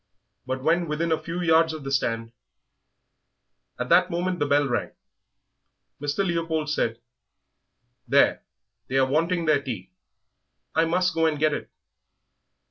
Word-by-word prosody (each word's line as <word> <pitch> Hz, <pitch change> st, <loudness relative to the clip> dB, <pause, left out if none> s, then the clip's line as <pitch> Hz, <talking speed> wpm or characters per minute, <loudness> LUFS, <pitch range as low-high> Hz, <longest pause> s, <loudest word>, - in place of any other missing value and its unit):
But 130 Hz, 0 st, -3 dB
when 170 Hz, +3 st, +2 dB
within 160 Hz, +2 st, -1 dB
a 160 Hz, -1 st, +1 dB
few 170 Hz, +3 st, -4 dB
yards 160 Hz, -1 st, +4 dB
of 155 Hz, -2 st, -7 dB
the 135 Hz, -, -5 dB
stand 115 Hz, -3 st, -1 dB, 0.7 s
" -, -, -44 dB
At -, -, -3 dB
that -, -, +5 dB
moment 175 Hz, +1 st, -2 dB
the 145 Hz, -, +1 dB
bell 145 Hz, 0 st, +3 dB
rang. 120 Hz, -, -2 dB, 1.1 s
Mr. 145 Hz, +7 st, -1 dB
Leopold 165 Hz, -3 st, -1 dB
said, 115 Hz, -6 st, -1 dB, 1.1 s
"There, -, -, +4 dB, 0.5 s
they 130 Hz, -, -1 dB
are 135 Hz, -, +5 dB
wanting 165 Hz, +5 st, 0 dB
their 155 Hz, -3 st, +3 dB
tea; 105 Hz, -9 st, -6 dB, 0.8 s
I 165 Hz, +1 st, +3 dB
must 180 Hz, +1 st, +1 dB
go 165 Hz, 0 st, +2 dB
and 155 Hz, -2 st, 0 dB
get 155 Hz, 0 st, +2 dB
it." -, -, -5 dB
155 Hz, 145 wpm, -25 LUFS, 135-165 Hz, 1.1 s, that